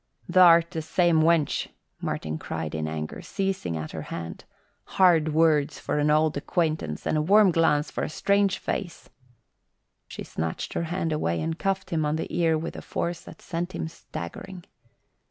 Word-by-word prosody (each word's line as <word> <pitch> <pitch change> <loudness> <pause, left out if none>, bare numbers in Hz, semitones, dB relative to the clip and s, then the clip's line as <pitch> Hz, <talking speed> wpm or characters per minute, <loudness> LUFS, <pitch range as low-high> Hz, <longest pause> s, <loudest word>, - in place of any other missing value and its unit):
"Th'art 170 -2 +6
the 165 -3 -3
same 170 0 +2
wench," 160 -2 +2 0.3
Martin 80 0 -3
cried 80 -2 -5
in 80 -1 -2
anger, 75 0 -5
seizing 190 - -2
at 80 0 -5
her - - -5
hand. 85 -1 -6 0.5
"Hard 165 -5 +5
words 150 -2 +3
for 150 - -2
old 155 0 +3
acquaintance, 155 - -2
and 155 - +1
a - - +2
warm 200 +4 +5
glance 160 -3 +2
for - - -3
a - - -2
strange 200 +4 +2
face." 175 -5 -5 1.0
She - - -7
snatched 80 0 -4
her 170 - -1
hand 165 -1 -2
away 85 - -1
and 165 +1 -3
cuffed 195 -1 -1
him 160 -2 +1
on 150 +1 0
the 160 - -4
ear 165 -2 +2
with 165 +2 -5
a - - -6
force 170 0 -3
that - - -13
sent 175 +2 -4
him - - -3
staggering. 170 - -8
160 Hz, 170 wpm, -26 LUFS, 150-175 Hz, 1.0 s, Th'art